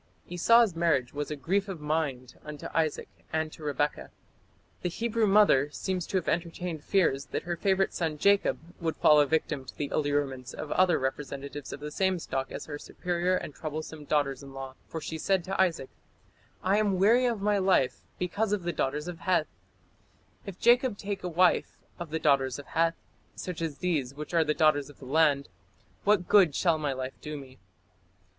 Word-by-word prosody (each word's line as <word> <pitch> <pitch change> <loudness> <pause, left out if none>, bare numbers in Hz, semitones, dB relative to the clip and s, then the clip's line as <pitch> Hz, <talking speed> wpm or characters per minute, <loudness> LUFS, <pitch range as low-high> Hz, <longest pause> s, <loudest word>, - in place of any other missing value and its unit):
" - - -30
Esau's 230 +3 +5
marriage 155 -7 +1
was 145 0 -3
"a 150 - -3
grief 190 +9 0
of 190 -4 -6
mind 150 -5 -2
unto 150 -1 -8
Isaac 160 -2 0 0.2
and 160 0 -1
to - - -13
Rebekah". 145 0 -1 0.7
The 180 - -1
Hebrew 230 +3 0
mother 195 -9 +5
seems 180 +3 -3
to 190 - 0
have 180 - -3
entertained 170 -2 -2
fears 155 -8 +2
that - - -3
her 175 0 -2
favourite 190 +2 +1
son 160 -3 -2
Jacob 200 +5 +3 0.2
would 165 -2 -2
fall 150 -1 +6
a 145 - +2
victim 155 -2 0
to 130 - -12
the 145 -2 -2
allurements 145 -4 -1
of 150 - -6
other 180 -3 +4
representatives 140 +1 -4
of 140 - -7
the 150 0 -5
same 190 +3 +1
stock 135 -5 -3
as - - -6
her 145 -1 -6
superior 180 +2 -1
and 150 - -4
troublesome 155 0 -6
daughters 140 -3 0
in 135 -1 -11
law, 135 -1 -6
for 165 - -5
she 160 +1 -5
said 190 +1 +1
to 190 +2 0
Isaac: 165 -8 0 0.7
"I 195 +3 +3
am 205 -3 +1
weary 230 +7 +4
of 235 -3 -1
my 205 0 +2
life 185 -9 +2 0.2
because 200 +4 -1
of 200 -4 -1
the 175 0 -2
daughters 150 +4 -2
of 175 -2 -6
Heth; 180 -5 0 0.9
if 190 -2 -7
Jacob 240 -2 +4
take 200 -2 -4
a 180 - -2
wife 175 +1 +2 0.2
of 170 -2 -6
the 160 - -1
daughters 140 -4 +2
of 145 - -9
Heth, 165 0 +1 0.4
such 180 -3 -6
as 160 -4 -3
these 145 -8 -1
which 150 +3 -7
are 170 - +4
of 160 - 0
the 150 - +1
daughters 150 -3 +3
of 145 - -15
the 135 - -12
land, 145 0 +3 0.6
what 200 -4 +3
good 185 -9 +5
shall 165 -4 +2
my 150 -2 -1
life 130 0 -4
do 150 0 -5
me?" 130 -2 -12
160 Hz, 195 wpm, -28 LUFS, 145-185 Hz, 0.9 s, fall